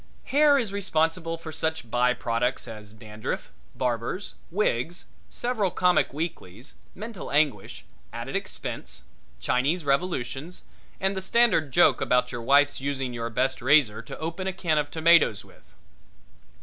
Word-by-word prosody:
Hair 290 Hz, +1 st, +4 dB
is 225 Hz, -7 st, -1 dB
responsible 165 Hz, -3 st, 0 dB
for 165 Hz, -1 st, -8 dB
such 160 Hz, -7 st, -3 dB
byproducts 125 Hz, 0 st, 0 dB
as 105 Hz, -2 st, -9 dB
dandruff, 110 Hz, -1 st, -6 dB, 0.2 s
barbers, 125 Hz, -, -2 dB, 0.2 s
wigs, 175 Hz, -, -1 dB, 0.2 s
several 240 Hz, -5 st, -1 dB
comic 180 Hz, 0 st, +2 dB
weeklies, 130 Hz, -, -6 dB, 0.2 s
mental 215 Hz, 0 st, -7 dB
anguish, 145 Hz, -9 st, 0 dB, 0.3 s
added -, -, -6 dB
expense, 65 Hz, -2 st, -5 dB, 0.4 s
Chinese 145 Hz, +7 st, 0 dB
revolutions, 140 Hz, +1 st, -2 dB, 0.4 s
and 190 Hz, +1 st, 0 dB
the 190 Hz, -, -3 dB
standard 190 Hz, -, +2 dB
joke -, -, +4 dB
about 125 Hz, 0 st, +2 dB
your 120 Hz, -, -5 dB
wife's 140 Hz, +3 st, +3 dB
using 135 Hz, -2 st, -2 dB
your 115 Hz, -1 st, -3 dB
best 130 Hz, +3 st, 0 dB
razor 130 Hz, -5 st, +4 dB
to 115 Hz, -, -9 dB
open 165 Hz, +4 st, -4 dB
a 190 Hz, -, -1 dB
can 165 Hz, -4 st, +1 dB
of 145 Hz, -, -2 dB
tomatoes 160 Hz, -10 st, +4 dB
with. -, -, -22 dB
145 Hz, 135 wpm, -26 LUFS, 125-180 Hz, 0.4 s, Hair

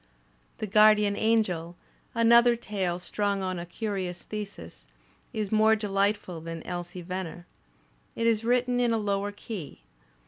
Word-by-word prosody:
"The -, -, -3 dB
Guardian 210 Hz, 0 st, +5 dB
Angel," 185 Hz, -7 st, +1 dB, 0.4 s
another 235 Hz, +1 st, +6 dB
tale 195 Hz, -6 st, -2 dB
strung 200 Hz, +2 st, -2 dB
on 185 Hz, -1 st, -2 dB
a 170 Hz, -, -7 dB
curious 185 Hz, -2 st, -4 dB
thesis, 200 Hz, -, -8 dB, 0.4 s
is 215 Hz, -3 st, -3 dB
more 220 Hz, 0 st, +5 dB
delightful 200 Hz, -4 st, -1 dB
than 165 Hz, 0 st, -7 dB
"Elsie 175 Hz, 0 st, -5 dB
Venner." 180 Hz, -1 st, -5 dB, 0.7 s
It 230 Hz, -, -1 dB
is 230 Hz, -1 st, +2 dB
written 245 Hz, +1 st, +2 dB
in 240 Hz, -2 st, +2 dB
a -, -, +2 dB
lower 205 Hz, -1 st, -1 dB
key. 205 Hz, -, -8 dB
205 Hz, 135 wpm, -28 LUFS, 180-220 Hz, 0.7 s, another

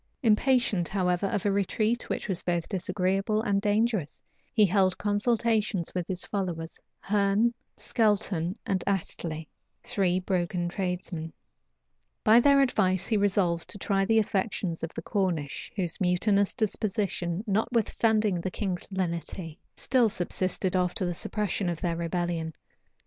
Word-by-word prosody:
Impatient, 220 Hz, -5 st, +3 dB
however, 185 Hz, -1 st, 0 dB
of 205 Hz, -2 st, -2 dB
a 205 Hz, -, +3 dB
retreat 215 Hz, +4 st, 0 dB
which -, -, -2 dB
was 185 Hz, -3 st, -1 dB
both 175 Hz, -2 st, -1 dB
disagreeable 195 Hz, +3 st, 0 dB
and 200 Hz, -3 st, +1 dB
dangerous, 210 Hz, -6 st, 0 dB, 0.3 s
he 215 Hz, -3 st, +5 dB
held 190 Hz, -1 st, +2 dB
consultations 215 Hz, -3 st, +1 dB
with 180 Hz, -2 st, -2 dB
his 185 Hz, -1 st, -2 dB
followers, 175 Hz, -5 st, -3 dB, 0.2 s
Herne, 205 Hz, +3 st, +2 dB, 0.2 s
Skelton, 205 Hz, -5 st, 0 dB
and 190 Hz, -2 st, 0 dB
Astley, 165 Hz, -5 st, -2 dB, 0.4 s
three 195 Hz, -7 st, +1 dB
broken 180 Hz, -1 st, -1 dB
tradesmen: 180 Hz, -3 st, -3 dB, 0.9 s
by 220 Hz, +2 st, +7 dB
their 280 Hz, +2 st, +5 dB
advice 190 Hz, -8 st, +1 dB
he 225 Hz, -, 0 dB
resolved 190 Hz, -4 st, +1 dB
to -, -, -3 dB
try 195 Hz, -1 st, +1 dB
the 225 Hz, +2 st, +3 dB
affections 195 Hz, -4 st, 0 dB
of 165 Hz, -, -4 dB
the -, -, -5 dB
Cornish, 175 Hz, -8 st, -2 dB
whose 180 Hz, -3 st, -2 dB
mutinous 195 Hz, +3 st, +2 dB
disposition, 200 Hz, -5 st, -1 dB
notwithstanding 215 Hz, -2 st, +1 dB
the 185 Hz, -, -2 dB
king's 185 Hz, -2 st, -3 dB
lenity, 170 Hz, -3 st, -3 dB, 0.2 s
still 245 Hz, -4 st, +2 dB
subsisted 185 Hz, 0 st, -1 dB
after 180 Hz, 0 st, +1 dB
the 175 Hz, -, -1 dB
suppression 200 Hz, +1 st, -1 dB
of 170 Hz, -2 st, -3 dB
their 170 Hz, -2 st, -1 dB
rebellion. 170 Hz, -1 st, -2 dB
195 Hz, 135 wpm, -28 LUFS, 175-210 Hz, 0.9 s, by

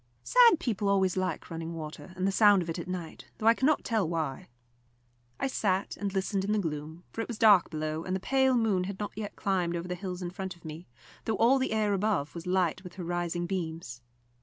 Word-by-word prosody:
Sad 475 Hz, -9 st, +6 dB
people 215 Hz, -, -1 dB
always 190 Hz, -2 st, +2 dB
like 185 Hz, -4 st, -2 dB
running 165 Hz, 0 st, -5 dB
water 155 Hz, +3 st, -7 dB
and 185 Hz, 0 st, -1 dB
the 195 Hz, -, +2 dB
sound 205 Hz, -2 st, +5 dB
of 165 Hz, -, -4 dB
it 165 Hz, -, -4 dB
at 170 Hz, -, -6 dB
night, 180 Hz, -3 st, -6 dB
though 215 Hz, -, -5 dB
I 225 Hz, -, +8 dB
cannot 280 Hz, +6 st, +2 dB
tell 215 Hz, -8 st, 0 dB
why. 160 Hz, -5 st, -3 dB, 0.9 s
I -, -, 0 dB
sat 200 Hz, -7 st, 0 dB
and 200 Hz, -1 st, -3 dB
listened 195 Hz, 0 st, -1 dB
in 205 Hz, +2 st, 0 dB
the -, -, +2 dB
gloom, 160 Hz, -2 st, -4 dB
for 225 Hz, -, -3 dB
it -, -, -4 dB
was 235 Hz, -, -5 dB
dark 210 Hz, -5 st, +6 dB
below, 155 Hz, 0 st, -3 dB
and 185 Hz, +1 st, -2 dB
the -, -, -1 dB
pale 265 Hz, +4 st, +3 dB
moon 205 Hz, -6 st, +1 dB
had 195 Hz, 0 st, -6 dB
not 210 Hz, -, -3 dB
yet 210 Hz, -1 st, -5 dB
climbed 180 Hz, -3 st, 0 dB
over 170 Hz, +1 st, -4 dB
the 180 Hz, -, -2 dB
hills 180 Hz, 0 st, -5 dB
in 175 Hz, -, -4 dB
front 190 Hz, 0 st, -5 dB
of 170 Hz, -, -21 dB
me, 160 Hz, +2 st, -8 dB, 0.4 s
though 220 Hz, -2 st, 0 dB
all 255 Hz, +4 st, +5 dB
the 260 Hz, -, -1 dB
air 215 Hz, -2 st, +1 dB
above 195 Hz, -7 st, 0 dB
was 170 Hz, 0 st, -7 dB
light 180 Hz, -1 st, +1 dB
with 180 Hz, -2 st, -10 dB
her 185 Hz, -, -6 dB
rising 175 Hz, 0 st, -2 dB
beams. 160 Hz, -9 st, -4 dB
185 Hz, 235 wpm, -29 LUFS, 170-210 Hz, 0.9 s, I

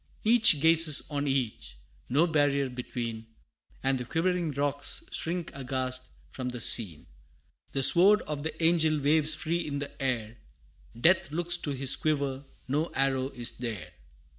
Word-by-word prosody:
Each 215 Hz, -8 st, +5 dB
gazes 160 Hz, -1 st, +6 dB
on 145 Hz, 0 st, -2 dB
each, 130 Hz, -, -3 dB, 0.3 s
no 145 Hz, +7 st, +3 dB
barrier 145 Hz, -4 st, 0 dB
between 115 Hz, -2 st, -6 dB, 0.6 s
And 135 Hz, -1 st, 0 dB
the -, -, -4 dB
quivering 175 Hz, +4 st, -1 dB
rocks 145 Hz, 0 st, -2 dB
shrink 170 Hz, 0 st, -2 dB
aghast 130 Hz, -1 st, -2 dB, 0.2 s
from 130 Hz, -1 st, -5 dB
the 125 Hz, -1 st, -7 dB
scene! 100 Hz, -9 st, 0 dB, 0.7 s
The 135 Hz, -, 0 dB
sword 195 Hz, +8 st, +5 dB
of 150 Hz, -2 st, -5 dB
the 160 Hz, +2 st, -5 dB
angel 160 Hz, -2 st, +2 dB
waves 155 Hz, +2 st, +2 dB
free 165 Hz, +2 st, -2 dB
in 145 Hz, -1 st, -4 dB
the 140 Hz, 0 st, -8 dB
air; 120 Hz, -4 st, -3 dB, 0.6 s
Death 170 Hz, +3 st, +3 dB
looks 175 Hz, +3 st, 0 dB
to 155 Hz, -, -6 dB
his 135 Hz, 0 st, +2 dB
quiver, 140 Hz, -3 st, -2 dB, 0.2 s
no 150 Hz, +5 st, -1 dB
arrow 135 Hz, -1 st, 0 dB
is 120 Hz, -3 st, -4 dB
there! 115 Hz, -6 st, -6 dB
140 Hz, 145 wpm, -28 LUFS, 130-160 Hz, 0.7 s, gazes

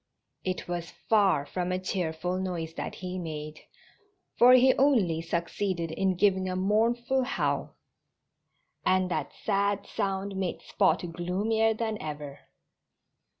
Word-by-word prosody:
It 185 Hz, -1 st, -3 dB
was 175 Hz, -2 st, -4 dB
far 195 Hz, -10 st, +2 dB
from 180 Hz, +3 st, -3 dB
a 185 Hz, -, +1 dB
cheerful 180 Hz, -1 st, -2 dB
noise 170 Hz, -4 st, -3 dB
that -, -, -5 dB
he 185 Hz, 0 st, -5 dB
made, 155 Hz, -2 st, -6 dB, 0.8 s
for 250 Hz, +1 st, +7 dB
he 255 Hz, +1 st, +7 dB
only 215 Hz, -, +3 dB
succeeded 170 Hz, +1 st, -2 dB
in 190 Hz, +3 st, 0 dB
giving 190 Hz, 0 st, +2 dB
a 185 Hz, -, -2 dB
mournful 235 Hz, +7 st, +1 dB
howl. 250 Hz, -, -1 dB, 1.1 s
And 185 Hz, -1 st, +2 dB
that -, -, -2 dB
sad 200 Hz, -1 st, 0 dB
sound 195 Hz, 0 st, -2 dB
made 190 Hz, -2 st, -3 dB
Spot -, -, +2 dB
gloomier 215 Hz, +6 st, +1 dB
than 220 Hz, -1 st, -3 dB
ever. 150 Hz, -2 st, -6 dB
185 Hz, 125 wpm, -28 LUFS, 170-210 Hz, 1.1 s, for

